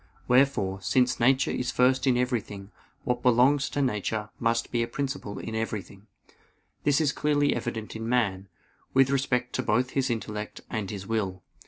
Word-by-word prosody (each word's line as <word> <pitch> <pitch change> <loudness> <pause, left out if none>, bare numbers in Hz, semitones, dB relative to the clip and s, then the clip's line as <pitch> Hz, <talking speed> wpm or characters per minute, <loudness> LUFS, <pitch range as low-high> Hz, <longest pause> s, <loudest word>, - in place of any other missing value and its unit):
Wherefore, 125 -7 +2
since 125 +6 +2
nature 130 +3 +3
is 125 0 -2
first 130 +1 +2
in 125 -2 +4
everything, 110 -5 -2 0.3
what 125 -2 -1
belongs 130 +4 +4
to 145 - -1
nature 105 -2 -2
must 115 0 0
be 120 - +1
a 115 - 0
principle 135 -5 -4
in 110 - -6
everything. 105 -2 -5 0.8
This 145 -1 +3
is 150 -3 +2
clearly 145 -1 +1
evident 115 -2 -4
in 115 +1 -4
man, 100 -6 0 0.5
with 135 0 +5
respect 125 -2 0
to - - +1
both 125 +4 +1
his 135 -1 0
intellect 105 -2 -4
and 105 -3 -3
his 100 -2 -6
will. 95 -4 -2
120 Hz, 165 wpm, -27 LUFS, 105-130 Hz, 0.8 s, with